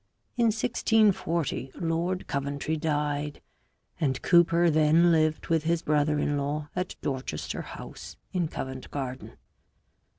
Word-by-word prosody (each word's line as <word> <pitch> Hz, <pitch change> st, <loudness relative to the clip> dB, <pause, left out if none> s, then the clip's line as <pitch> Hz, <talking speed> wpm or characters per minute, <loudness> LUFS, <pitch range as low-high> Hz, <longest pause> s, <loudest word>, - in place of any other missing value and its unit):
In 240 Hz, -1 st, +2 dB
1640 215 Hz, -, +1 dB
Lord 170 Hz, +2 st, -1 dB
Coventry 140 Hz, +2 st, -2 dB
died, 150 Hz, -2 st, -1 dB, 0.6 s
and 135 Hz, -4 st, 0 dB
Cooper 170 Hz, -1 st, +5 dB
then 155 Hz, +3 st, +5 dB
lived 155 Hz, -1 st, +2 dB
with 160 Hz, -2 st, +2 dB
his 165 Hz, 0 st, +1 dB
brother 150 Hz, 0 st, +2 dB
in 145 Hz, 0 st, 0 dB
law 145 Hz, +1 st, -3 dB
at 180 Hz, 0 st, -3 dB
Dorchester 130 Hz, -, -3 dB
House -, -, -9 dB, 0.2 s
in 180 Hz, -3 st, +1 dB
Covent 130 Hz, -3 st, -6 dB
Garden. 130 Hz, -2 st, -6 dB
155 Hz, 120 wpm, -28 LUFS, 145-170 Hz, 0.6 s, Cooper